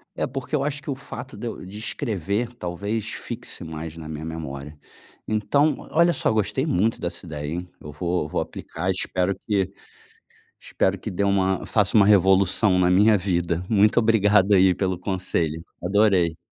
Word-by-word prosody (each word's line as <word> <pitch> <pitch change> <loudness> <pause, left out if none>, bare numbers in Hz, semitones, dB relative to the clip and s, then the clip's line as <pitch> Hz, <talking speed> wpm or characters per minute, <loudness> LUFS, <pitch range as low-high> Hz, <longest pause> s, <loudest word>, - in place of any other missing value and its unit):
É, - - -1
porque 135 +3 -4
eu 140 - 0
acho 145 0 -1
que 140 - -5
o - - -2
fato 130 -1 -9
de 120 - -5
eu 115 - -7
de 100 +3 -8
escrever, 110 - -2
talvez 100 +2 -4
fixe - - -6
mais 80 0 -7
na 80 -2 -8
minha 80 0 -6
memória. 75 -2 -7 0.5
Então, 140 +8 +1
olha 170 +2 +4
só, - - +1
eu 110 - 0
gostei 110 +7 0
muito 110 - +1
dessa 90 +2 -5
ideia, 75 -3 -5
hein. 90 +1 -4 0.2
Eu 75 - -8
vou 85 +4 -1
eu - - -5
vou - - -1
aplicar, 95 - -4
espero 95 +1 -1
que 95 -3 +1 0.9
espero 95 0 -1
que 110 - -5
dê 100 0 -1
uma 95 -1 +1
faça 105 0 +2
uma 100 - +7
revolução 95 0 +4
na 90 0 +3
minha 105 +3 +5
vida. 90 -2 -1
Muito 105 0 +3
obrigado 105 -3 +4
aí 95 -1 +5
pelo 95 -2 -1
conselho. 85 -4 -2 0.2
Adorei. 95 -4 +3
95 Hz, 180 wpm, -24 LUFS, 90-110 Hz, 0.9 s, uma